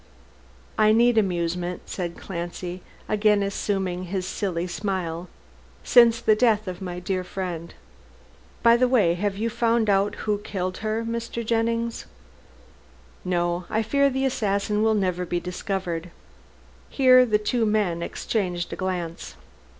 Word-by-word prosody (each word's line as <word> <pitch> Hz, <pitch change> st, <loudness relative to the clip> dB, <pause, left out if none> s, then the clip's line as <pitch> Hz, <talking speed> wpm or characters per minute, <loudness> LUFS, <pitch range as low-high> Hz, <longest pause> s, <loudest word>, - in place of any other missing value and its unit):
"I 215 Hz, 0 st, +5 dB
need 235 Hz, 0 st, +4 dB
amusement," 175 Hz, -2 st, -2 dB
said 175 Hz, -2 st, -5 dB
Clancy, 175 Hz, 0 st, -6 dB, 0.3 s
again 210 Hz, -1 st, +3 dB
assuming 190 Hz, -2 st, -2 dB
his 185 Hz, 0 st, -3 dB
silly 180 Hz, -3 st, -2 dB
smile, 180 Hz, -2 st, -3 dB, 0.5 s
"since 235 Hz, -2 st, +6 dB
the 215 Hz, -, +3 dB
death 215 Hz, -2 st, +2 dB
of 180 Hz, 0 st, -6 dB
my 180 Hz, -1 st, -5 dB
dear 185 Hz, +1 st, -2 dB
friend. 180 Hz, -3 st, -5 dB, 0.9 s
By 235 Hz, 0 st, +6 dB
the 255 Hz, +1 st, +3 dB
way, 220 Hz, -10 st, +3 dB
have 195 Hz, +2 st, -2 dB
you 225 Hz, +3 st, -1 dB
found 230 Hz, -2 st, +2 dB
out 195 Hz, +1 st, +2 dB
who 210 Hz, -1 st, 0 dB
killed 185 Hz, -3 st, -4 dB
her, 220 Hz, +1 st, -2 dB
Mr. 235 Hz, 0 st, -4 dB
Jennings?" 230 Hz, +1 st, -1 dB, 1.2 s
"No. 175 Hz, -1 st, -1 dB
I 220 Hz, +1 st, 0 dB
fear 280 Hz, +5 st, +3 dB
the 265 Hz, 0 st, -1 dB
assassin 210 Hz, -4 st, 0 dB
will 220 Hz, 0 st, +3 dB
never 185 Hz, -3 st, 0 dB
be 175 Hz, 0 st, -2 dB
discovered." 180 Hz, -2 st, -4 dB, 0.8 s
Here 255 Hz, -2 st, +6 dB
the 220 Hz, -4 st, +2 dB
two 225 Hz, +3 st, 0 dB
men 210 Hz, -6 st, +1 dB
exchanged 180 Hz, -2 st, -2 dB
a -, -, -3 dB
glance. 175 Hz, -, -4 dB
200 Hz, 135 wpm, -24 LUFS, 180-225 Hz, 1.2 s, since